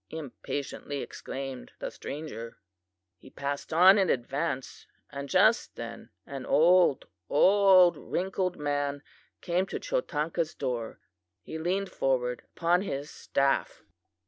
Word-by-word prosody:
impatiently 145 -1 -5
exclaimed 135 -1 -7
the - - -5
stranger. 140 -6 -7 0.6
"He - - -15
passed 140 +1 -4
on 185 +5 +7
in 190 - +2
advance, 135 +2 -2 0.2
and 140 -1 -6
just 220 - +3
then 115 -1 -8 0.2
an 135 -2 -7
old, 175 -1 +4 0.2
old 190 +1 +6
wrinkled 185 0 -2
man 145 -1 -2 0.4
came 180 +1 0
to - - -4
Chotanka's 170 - -2
door. 120 -4 -3 0.4
He 160 - -6
leaned 185 +4 -1
forward 125 -2 0 0.2
upon 175 +2 +3
his 145 -6 -4
staff. 135 0 0
150 Hz, 115 wpm, -29 LUFS, 135-180 Hz, 0.6 s, on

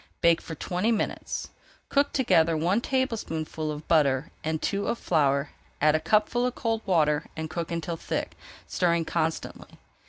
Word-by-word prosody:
Bake 170 -1 +4
for 160 - -7
twenty 180 +8 -1
minutes. 220 - -2 0.4
Cook 285 0 +2
together 165 - +3
one 180 +8 +2
tablespoonful 165 - -2
of 150 0 -7
butter 145 -3 +3
and 160 0 -1
two 200 +5 -1
of 235 - 0
flour, 140 -6 +1 0.3
add 155 +1 +4
a 155 - +3
cupful 215 +8 +2
of 250 0 0
cold 225 -1 -1
water 155 -4 +2
and 160 0 -4
cook 170 0 -4
until 170 0 -3
thick, - - -3 0.3
stirring 170 -2 +1
constantly. 160 -1 -2
165 Hz, 155 wpm, -27 LUFS, 155-210 Hz, 0.4 s, Bake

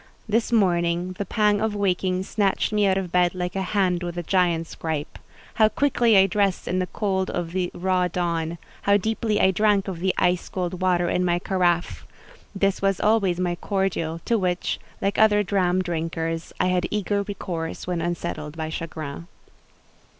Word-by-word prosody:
This 225 +2 +1
morning 175 -4 +2
the 200 - -2
pang 210 -1 +2
of 220 -1 0
waking 185 -2 0
snatched 200 +1 0
me 210 -1 +3
out 190 0 +2
of 185 -3 -3
bed 180 0 +2
like 180 0 -3
a 195 - 0
hand 185 -2 +1
with 175 -1 -5
a 175 - -2
giant's 170 -2 +1
gripe. 155 -2 -4 0.3
How 215 -1 +4
quickly 240 -5 +3
I 190 - +7
dressed 195 -1 0
in 185 - 0
the 185 - -1
cold 190 0 -1
of 175 -2 -3
the 180 0 -1
raw 185 0 +1
dawn! 170 -2 -2 0.2
How 200 0 +4
deeply 220 +1 -1
I 190 - +5
drank 205 0 +2
of 185 -3 -4
the 185 +1 0
ice 180 0 +1
cold 180 -1 -3
water 180 -1 +2
in 180 - +1
my 175 -1 +2
carafe! 175 -1 0 0.5
This 195 0 +1
was 195 -2 +1
always 205 -5 +2
my 180 -1 0
cordial, 175 -3 -2
to 230 -2 +2
which, 180 -2 -1 0.2
like 195 +1 0
other 210 -1 +5
dram 185 -2 +1
drinkers, 165 -1 -3
I 185 - +2
had 180 -1 +1
eager 205 -1 0
recourse 180 -5 -5
when 180 -2 -2
unsettled 165 -2 -4
by 160 -1 -3
chagrin. 160 -1 -6
185 Hz, 180 wpm, -24 LUFS, 175-200 Hz, 0.5 s, I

